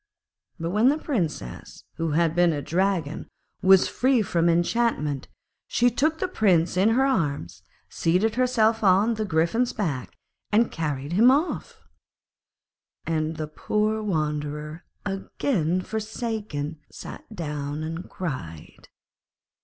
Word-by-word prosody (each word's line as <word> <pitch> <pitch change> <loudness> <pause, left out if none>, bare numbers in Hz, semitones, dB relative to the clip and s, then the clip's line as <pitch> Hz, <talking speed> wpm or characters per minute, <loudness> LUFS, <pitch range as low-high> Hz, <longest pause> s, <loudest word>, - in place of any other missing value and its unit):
But 165 +1 -2
when 215 +6 +4
the 295 - +2
Princess 175 - -4
who 165 -2 -1
had 165 0 +2
been 175 0 +4
a 145 - -2
Dragon 175 -4 -1 0.3
was 190 -1 +6
free 255 -3 +2
from 170 -3 +1
enchantment, 170 - +1 0.4
she 245 0 +3
took 310 +7 +1
the 370 - -1
Prince 180 - +2
in 190 +4 +4
her 255 +4 +3
arms, 140 - -1 0.3
seated 185 +7 +1
herself 230 -3 +2
on 200 +4 +4
the 215 -1 -2
Griffin's 180 +8 +1
back, 150 -12 -3 0.4
and 220 +3 +3
carried 150 -2 -3
him 225 +7 +6
off. 295 +7 0 1.3
And 160 0 -1
the 155 - -2
poor 215 +7 -1
wanderer, 150 -3 -3 0.2
again 195 - -1
forsaken, 215 -9 -4
sat 220 - -10
down 150 -2 -4
and 165 +3 -5
cried. 110 - -7
180 Hz, 120 wpm, -25 LUFS, 155-220 Hz, 1.3 s, was